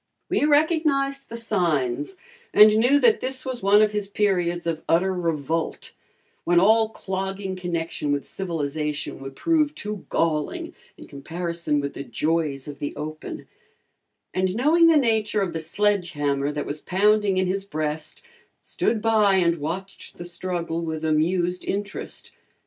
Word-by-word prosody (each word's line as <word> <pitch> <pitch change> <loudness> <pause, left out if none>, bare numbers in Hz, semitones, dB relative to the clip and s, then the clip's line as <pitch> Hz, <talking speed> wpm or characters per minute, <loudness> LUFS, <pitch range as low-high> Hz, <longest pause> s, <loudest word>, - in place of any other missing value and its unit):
We - - +2
recognized 290 -3 +2
the 230 - -6
signs 180 - -1 0.4
and 215 0 +8
knew 250 +6 +4
that 455 -2 +5
this 260 0 -4
was 255 -2 -4
one 205 +2 +5
of 210 - +2
his 210 -1 -2
periods 180 -4 0
of 165 -1 -2
utter 185 +3 +3
revolt, 165 -2 -2 0.5
when 175 0 +4
all 220 +3 +4
clogging 195 -2 -4
connection 170 -4 -3
with 145 -1 -1
civilization 150 -4 -3
would 135 0 -8
prove 310 - +1
too 210 -2 -6
galling 155 -2 -1 0.2
in - - -11
comparison 170 +1 -3
with 140 0 -3
the - - -6
joys 145 +2 -1
of 145 -1 -8
the 145 - -4
open, 155 +1 -7 0.9
and 185 0 0
knowing 315 +8 +5
the 325 -2 +6
nature 220 -5 +1
of 175 -3 -3
the 165 - -2
sledge 180 +2 0
hammer 145 -1 0
that 150 0 -3
was 150 +1 -5
pounding 205 +1 +2
in 185 - +2
his 190 +2 -1
breast, 155 -4 -4 0.4
stood 220 -2 -1
by 215 -3 +4
and 170 -3 +2
watched 180 +6 -6
the 175 - -7
struggle 170 -1 -3
with 160 -1 -3
amused 175 +3 +1
interest. 205 +1 -5
185 Hz, 150 wpm, -24 LUFS, 160-215 Hz, 0.9 s, and